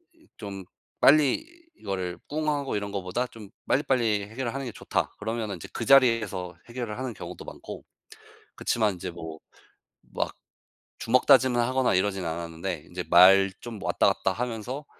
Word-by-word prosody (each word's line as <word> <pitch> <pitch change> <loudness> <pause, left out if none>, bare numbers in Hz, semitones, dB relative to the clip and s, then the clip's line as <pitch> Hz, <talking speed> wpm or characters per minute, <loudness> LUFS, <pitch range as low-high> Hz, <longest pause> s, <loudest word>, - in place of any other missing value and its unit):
이 320 -1 -25
좀 100 -3 -7 0.4
빨리 150 - +5 0.3
이거를 95 -3 -4
꿍하고 150 -3 -1
이런 100 -1 -3
것보다 100 +5 -2
좀 110 -4 -12 0.2
빨리빨리 120 -7 +2
해결하는 130 +3 -3
게 120 - -5
좋다 - - -2
그러면 110 0 -3
인제 90 -5 -7
그 115 - -3
자리에서 110 -10 +3
해결을 120 -3 -5
하는 130 -1 -4
경우도 90 0 -8
많고. - - -9 0.7
그렇지만 110 -4 +1
인제 90 +1 -6
뭐 80 -2 -8 0.8
막 - - -2 0.6
주먹다짐을 130 +1 +4
하거나 130 +1 +1
이러진 95 0 0
않았는데 85 0 -4
인제 90 0 -5
말 95 +2 +7
좀 115 -4 -8
왔다 - - +2
갔다 95 - -1
하면서 125 +5 -4
110 Hz, 325 characters per minute, -27 LUFS, 95-130 Hz, 0.8 s, 말